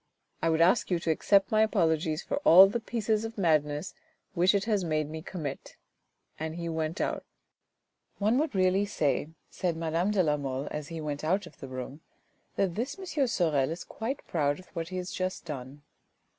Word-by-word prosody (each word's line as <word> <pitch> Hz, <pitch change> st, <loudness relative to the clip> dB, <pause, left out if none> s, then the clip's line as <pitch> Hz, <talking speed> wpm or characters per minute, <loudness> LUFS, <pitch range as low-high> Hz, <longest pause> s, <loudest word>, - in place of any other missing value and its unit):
I 165 Hz, -, +2 dB
would 160 Hz, 0 st, +2 dB
ask 185 Hz, +8 st, +4 dB
you 180 Hz, -, +2 dB
to 165 Hz, -1 st, 0 dB
accept 195 Hz, +5 st, +3 dB
my 215 Hz, 0 st, +4 dB
apologies 160 Hz, -6 st, +1 dB
for -, -, -2 dB
all 190 Hz, -, +9 dB
the 205 Hz, +4 st, -1 dB
pieces 220 Hz, -2 st, -1 dB
of 225 Hz, 0 st, -6 dB
madness 155 Hz, -3 st, +1 dB, 0.4 s
which 185 Hz, +2 st, +3 dB
it 200 Hz, -, +1 dB
has 210 Hz, -4 st, +1 dB
made 155 Hz, -3 st, 0 dB
me 160 Hz, +1 st, -6 dB
commit." 155 Hz, -5 st, -6 dB, 0.6 s
And 160 Hz, 0 st, -4 dB
he 170 Hz, 0 st, -4 dB
went 160 Hz, +2 st, -2 dB
out. -, -, -1 dB, 0.5 s
" -, -, -48 dB
One 215 Hz, +5 st, +2 dB
would 300 Hz, -7 st, -1 dB
really 190 Hz, +2 st, +3 dB
say," 145 Hz, -7 st, 0 dB, 0.2 s
said 175 Hz, -4 st, -2 dB
madame 165 Hz, +3 st, 0 dB
de 205 Hz, -3 st, +3 dB
la 150 Hz, -2 st, +2 dB
Mole, 135 Hz, 0 st, -3 dB
as 150 Hz, -1 st, -4 dB
he 165 Hz, -1 st, -6 dB
went 145 Hz, -1 st, -4 dB
out 190 Hz, +6 st, +1 dB
of -, -, -15 dB
the 135 Hz, -, -7 dB
room, 130 Hz, +3 st, -7 dB, 0.3 s
" -, -, -42 dB
that 190 Hz, -3 st, +1 dB
this 255 Hz, -, -3 dB
M. 345 Hz, -8 st, -1 dB
Sorel 155 Hz, -, +1 dB
is 165 Hz, +2 st, -5 dB
quite 240 Hz, +5 st, -5 dB
proud 145 Hz, -3 st, 0 dB
of 185 Hz, -, -15 dB
what 165 Hz, 0 st, -5 dB
he 185 Hz, -, -4 dB
has 180 Hz, 0 st, -4 dB
just 185 Hz, -1 st, -3 dB
done." 140 Hz, -2 st, -7 dB
170 Hz, 200 wpm, -29 LUFS, 155-200 Hz, 0.6 s, all